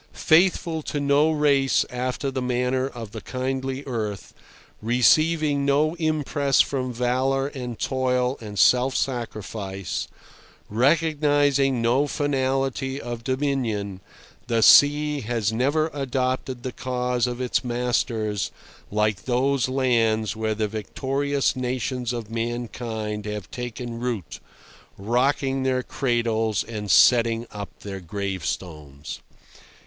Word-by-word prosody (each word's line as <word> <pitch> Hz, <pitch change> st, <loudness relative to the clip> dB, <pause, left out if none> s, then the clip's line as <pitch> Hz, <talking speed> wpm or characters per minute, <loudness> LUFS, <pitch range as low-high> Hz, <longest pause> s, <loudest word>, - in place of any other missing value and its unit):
Faithful 165 Hz, -1 st, +3 dB
to 150 Hz, -, -3 dB
no 145 Hz, +2 st, +3 dB
race 145 Hz, -3 st, +3 dB
after 130 Hz, +2 st, -2 dB
the 130 Hz, -1 st, -3 dB
manner 125 Hz, +1 st, 0 dB
of 115 Hz, -6 st, -8 dB
the -, -, -7 dB
kindly 130 Hz, +1 st, -3 dB
earth, 110 Hz, -6 st, -4 dB, 0.5 s
receiving 145 Hz, +5 st, +3 dB
no 145 Hz, +3 st, +2 dB
impress 145 Hz, -4 st, +1 dB
from 130 Hz, -2 st, +1 dB
valour 130 Hz, +3 st, 0 dB
and 125 Hz, -5 st, -6 dB
toil 125 Hz, -1 st, 0 dB
and 105 Hz, -2 st, -8 dB
self 125 Hz, +7 st, +4 dB
sacrifice, 105 Hz, -6 st, -3 dB, 0.6 s
recognising 145 Hz, -1 st, +2 dB
no 130 Hz, +5 st, +3 dB
finality 135 Hz, -1 st, -1 dB
of 120 Hz, -2 st, -6 dB
dominion, 125 Hz, -8 st, -1 dB, 0.5 s
the 115 Hz, -2 st, +2 dB
sea 145 Hz, +2 st, +6 dB
has 110 Hz, -2 st, -1 dB
never 145 Hz, +7 st, +1 dB
adopted 130 Hz, -2 st, -2 dB
the 130 Hz, -, -3 dB
cause 125 Hz, -1 st, -1 dB
of 120 Hz, 0 st, -4 dB
its 125 Hz, -1 st, 0 dB
masters 120 Hz, -4 st, -1 dB, 0.4 s
like 105 Hz, -2 st, 0 dB
those 130 Hz, +1 st, +1 dB
lands 115 Hz, -5 st, +1 dB
where 110 Hz, 0 st, -1 dB
the 110 Hz, 0 st, 0 dB
victorious 135 Hz, +7 st, -1 dB
nations 125 Hz, -1 st, -2 dB
of 120 Hz, -3 st, -4 dB
mankind 115 Hz, -2 st, -4 dB
have 105 Hz, -5 st, -5 dB
taken 120 Hz, -1 st, -5 dB
root, 120 Hz, -8 st, -4 dB, 0.6 s
rocking 135 Hz, +5 st, +1 dB
their 130 Hz, -1 st, 0 dB
cradles 115 Hz, -6 st, 0 dB
and 105 Hz, -3 st, -6 dB
setting 115 Hz, 0 st, +5 dB
up 100 Hz, -1 st, -8 dB
their 100 Hz, -1 st, -6 dB
gravestones. 85 Hz, -6 st, -5 dB
125 Hz, 110 wpm, -24 LUFS, 115-135 Hz, 0.6 s, sea